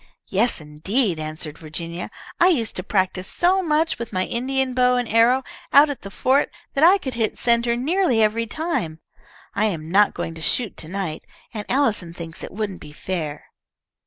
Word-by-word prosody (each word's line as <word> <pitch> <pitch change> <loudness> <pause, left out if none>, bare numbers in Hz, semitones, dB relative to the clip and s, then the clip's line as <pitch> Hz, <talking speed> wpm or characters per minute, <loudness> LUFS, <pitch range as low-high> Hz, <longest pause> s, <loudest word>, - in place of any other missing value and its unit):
"Yes, 215 +3 +1
indeed!" 165 - 0
answered 155 0 -6
Virginia. 165 +2 -6 0.3
"I 350 - +6
used 255 -12 +1
to - - -1
practise 190 -1 0
so 370 +2 +2
much 320 -3 +1
with 235 -1 -5
my 185 -2 0
Indian 260 +2 -1
bow 250 0 +3
and 245 -1 0
arrow 235 +4 +4 0.3
out 290 +1 +7
at 280 - -7
the 200 - -8
fort, 260 +8 +2 0.2
that 275 - +1
I 365 +4 +8
could 265 -9 -5
hit 225 -2 -1
centre 235 0 +2
nearly 285 0 +1
every 220 +1 +2
time. 220 - -3 0.5
I 210 - +1
am 165 -6 -3
not 205 +2 +4
going 165 - -4
to 165 - -10
shoot 225 +6 0
to 155 - -4
night. 180 -3 -4 0.3
Aunt 210 -2 -6
Allison 215 -11 +1
thinks 165 -2 -7
it - - -7
wouldn't 200 -2 -4
be 150 - -10
fair." 155 -3 -4
220 Hz, 185 wpm, -22 LUFS, 175-260 Hz, 0.5 s, I